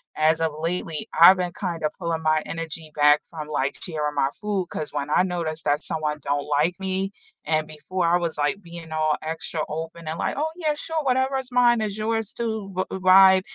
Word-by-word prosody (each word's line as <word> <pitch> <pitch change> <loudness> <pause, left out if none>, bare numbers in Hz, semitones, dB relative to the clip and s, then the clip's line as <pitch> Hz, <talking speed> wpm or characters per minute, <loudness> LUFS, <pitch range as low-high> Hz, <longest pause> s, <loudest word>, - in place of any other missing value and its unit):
as 160 +1 +2
of 160 -1 +1
lately, 165 -1 -3
I've 185 +3 +9
been 180 -1 -2
kind 175 -5 -4
of 155 - +1
pulling 165 -2 -2
my 155 0 +2
energy 165 -1 -6
back 150 0 +5
from, 155 -3 -7
like, 145 -2 -1
sharing 150 -4 -3
my 135 -1 +2
food, 205 -4 -2
'cause 150 - -4
when 145 0 -3
I 165 - +4
noticed 170 -3 -3
that 145 +2 +2
someone 150 -1 -2
don't 145 +1 -1
like 170 +4 +1
me, 190 0 -2 0.3
and 155 0 0
before 155 +4 -3
I 170 - +4
was 170 -3 -3
like 145 +7 0
being 170 -3 -10
all 155 -1 +2
extra 160 0 -4
open 160 +1 -6
and, 160 +1 -3
like, - - -1
"Oh 305 - +1
yeah, 315 -4 0
sure, 315 0 -3
whatever's 260 0 0
mine 240 -2 +4
is 210 -1 -2
yours 225 0 -1
too," 220 -4 -3
v 185 - +1 0.2
vibe. 190 0 +7
165 Hz, 205 wpm, -24 LUFS, 155-195 Hz, 0.3 s, I've